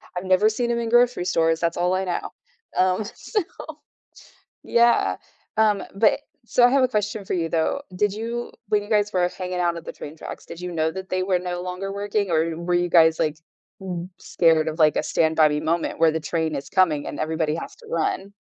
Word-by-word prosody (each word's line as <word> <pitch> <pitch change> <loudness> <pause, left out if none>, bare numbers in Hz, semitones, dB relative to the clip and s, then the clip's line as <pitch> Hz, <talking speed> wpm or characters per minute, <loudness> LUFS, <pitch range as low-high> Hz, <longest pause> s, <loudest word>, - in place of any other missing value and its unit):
I've 180 - -4
never 190 +3 +4
seen 235 +2 -1
'em 235 - 0
in 230 -1 -2
grocery 240 -5 +3
stores, 165 -2 +2
that's 170 -1 -1
all 180 +1 +1
I 190 +1 0
know, 180 - -3 0.5
um, 185 +3 +2
so 420 - -3 1.2
yeah. 235 0 +3 0.4
Um, 210 -3 +3
but 215 +7 +3 0.2
so, 245 - +2
I - - +6
have 270 +1 +3
a 255 - +4
question 210 -3 -2
for - - -3
you, 170 -2 0
though. 165 +13 0
Did 205 +1 +1
you 230 +3 -4 0.2
when 210 -1 +2
you 205 - -12
guys 210 -1 +2
were 180 -1 +2
hanging 180 -1 -5
out 170 -1 +1
at 165 - -9
the - - -6
train 150 +2 -9
tracks, - - -8
did 170 - -10
you 180 0 -5
know 160 -1 0
that 190 +2 -7
they 185 - 0
were 185 -1 +2
no 175 0 -4
longer 185 +2 -5
working, 200 -1 -1
or 160 0 +3
w 165 0 -5
were 175 +1 -1
you 175 0 +1
guys, 160 -2 +5
like, 155 0 0 0.4
b 180 -2 -5
scared 160 -2 +2
of, 160 +1 -4
like, 155 -1 +5
a - - +1
stand-by-me 155 -2 +2
moment 165 +2 -1
where 165 -1 +5
the 160 - -2
train 160 0 -2
is 140 0 -6
coming 165 -7 +2
and - - -6
everybody 155 -1 -1
has 165 - -7
to 460 - -16
run? 385 - -2
180 Hz, 220 wpm, -23 LUFS, 165-210 Hz, 1.2 s, I